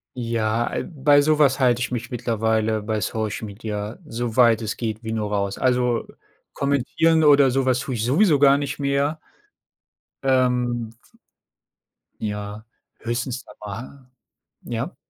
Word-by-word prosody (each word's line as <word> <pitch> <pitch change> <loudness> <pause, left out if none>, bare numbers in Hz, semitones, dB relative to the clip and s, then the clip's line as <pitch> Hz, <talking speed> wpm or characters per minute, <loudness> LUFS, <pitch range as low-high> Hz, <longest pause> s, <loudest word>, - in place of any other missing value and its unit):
Ja, 115 -1 -1
äh, - - -1
bei 145 -2 +3
so 155 +1 +2
was 140 -2 +4
halte 120 -2 +3
ich 125 - -1
mich 120 -1 -4
mittlerweile 110 -2 0
bei 110 0 -1
Social 110 +2 -3
Media 105 +1 -5
so 115 -1 -4
weit 115 -3 +5
es 110 -1 -3
geht 110 -1 -4
wie 110 0 -4
nur 105 -2 -2
raus, 100 -1 -1
also, 125 -2 +1 0.5
kommentieren 140 +4 +1
oder 140 -2 +6
so 135 +1 0
was 130 -1 +2
tue 140 0 -4
ich 110 - -2
sowieso 150 - +4
gar 140 0 +5
nicht 140 -1 -3
mehr. 140 +2 0 1.0
Ähm 125 -3 +1 1.3
Ja, 105 0 -5 0.4
höchstens 120 +2 -3
da - - -15
mal, 125 +5 -9 0.5
ja? 120 +8 -4
120 Hz, 145 wpm, -23 LUFS, 110-135 Hz, 1.3 s, oder